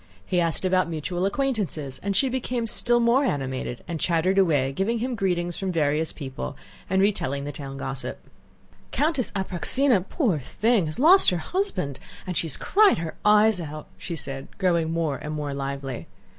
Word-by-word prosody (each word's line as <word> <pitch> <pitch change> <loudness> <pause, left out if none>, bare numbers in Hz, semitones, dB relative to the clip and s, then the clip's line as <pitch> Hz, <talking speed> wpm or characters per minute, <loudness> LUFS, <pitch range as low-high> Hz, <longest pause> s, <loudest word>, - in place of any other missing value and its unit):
He 180 - +1
asked 170 +2 -1
about 185 -1 +2
mutual 175 +4 -2
acquaintances, 200 - -2
and 200 0 -2
she 270 - +3
became 250 -2 -2
still 240 +1 +1
more 235 +4 +3
animated 130 - -3
and 165 -2 -4
chattered 180 +4 +2
away 145 -8 +2
giving 205 +10 0
him 250 +3 -2
greetings 175 -5 -1
from 190 -1 -2
various 155 -1 0
people 130 - -6 0.3
and 190 +1 +2
retelling 140 -9 0
the 145 - -4
town 135 -1 -7
gossip. 135 0 -4 0.7
"Countess 295 -5 0
Apráksina, 195 - +4
poor 225 - +1
thing, 210 - +1
has 155 - -5
lost 340 +9 +6
her 180 - -1
husband 170 - -3 0.3
and 180 -2 -4
she 165 - 0
has 150 - -3
cried 415 0 +4
her 165 -1 -5
eyes 210 -2 +5
out," 155 -1 -8
she 170 - -6
said, 135 -2 -5
growing 170 -4 +1
more 165 -4 -1
and 150 0 -5
more 145 -2 -3
lively. 135 -2 -5
175 Hz, 170 wpm, -25 LUFS, 145-220 Hz, 0.7 s, lost